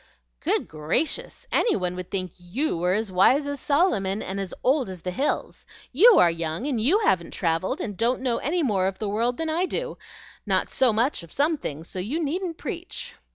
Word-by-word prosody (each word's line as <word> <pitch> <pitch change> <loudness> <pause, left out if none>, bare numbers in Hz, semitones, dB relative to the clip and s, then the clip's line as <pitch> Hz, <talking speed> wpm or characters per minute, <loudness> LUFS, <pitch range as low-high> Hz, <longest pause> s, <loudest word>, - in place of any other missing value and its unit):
"Good - - 0
gracious! 155 - -2
any 475 - +3
one 180 -2 -1
would 180 -1 -6
think 185 -3 -2
YOU 195 - -2
were 180 +2 +1
as 215 -2 -2
wise 255 +11 +4
as 285 -1 -4
Solomon 220 - +1
and 195 +1 -4
as 195 -2 -4
old 265 -4 +2
as 185 -3 -8
the 180 - -2
hills. 270 +11 -2 0.3
YOU 425 - +7
are 170 - +6
young, 165 +6 -3
and 260 -6 -1
YOU 300 - +4
haven't 175 - +1
travelled, 175 - 0
and 210 - -4
don't 235 +5 +1
know 245 -3 +1
any 335 +4 0
more 195 -8 +1
of 190 0 -3
the 215 - -3
world 230 +4 0
than 325 - -2
I 335 +4 0
do, - - -3 0.4
not - - 0
so 260 -3 +3
much 230 +2 +1
of 170 - -13
some 300 +4 +2
things; 160 - -6
so 185 - -6
you 235 - -2
needn't 335 +2 -2
preach." - - -5
225 Hz, 205 wpm, -25 LUFS, 185-290 Hz, 0.4 s, YOU